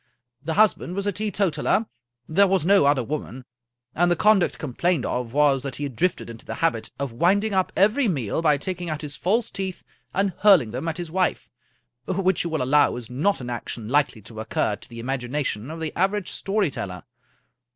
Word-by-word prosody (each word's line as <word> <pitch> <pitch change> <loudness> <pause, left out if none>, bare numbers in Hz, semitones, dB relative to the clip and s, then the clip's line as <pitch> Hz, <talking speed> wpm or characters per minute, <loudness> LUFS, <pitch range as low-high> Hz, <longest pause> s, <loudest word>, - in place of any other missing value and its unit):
The 160 +1 -2
husband 205 -4 +2
was 200 0 -2
a 205 - +1
teetotaler, 205 +1 0 0.4
there 195 +5 +4
was 190 -4 +1
no 195 -4 +5
other 140 -3 +3
woman, 130 -1 -5 0.5
and 175 +1 +2
the 175 - +3
conduct 210 0 +3
complained 155 +2 -1
of 125 -2 -2
was 140 -1 +3
that 135 -2 -5
he 145 - -5
had 140 -4 -4
drifted 180 +5 0
into 115 -1 -10
the - - -6
habit 165 -9 0
of 140 -2 -3
winding 195 - +2
up 190 -1 +1
every 215 +7 +3
meal 135 - -1
by 150 -3 +3
taking 180 +3 -4
out 155 0 -4
his 145 -2 -3
false 215 +8 0
teeth 190 -2 -5 0.3
and 195 0 0
hurling 185 - +5
them 130 +8 -4
at 165 - -2
his 175 -3 -6
wife, 185 +1 -1 0.6
which 190 -1 +1
you 170 - -3
will 160 -5 -1
allow 145 +3 +3
is 125 -1 -8
not 150 +7 0
an 125 0 -5
action 115 -2 -6
likely 140 -6 +1
to 110 0 -10
occur 110 -1 -1
to 100 - -15
the 115 -1 -9
imagination 125 -1 -3
of 160 +1 -6
the 160 -2 -4
average 195 +1 0
story 195 -5 0
teller. 90 -7 -6
160 Hz, 200 wpm, -24 LUFS, 130-190 Hz, 0.6 s, no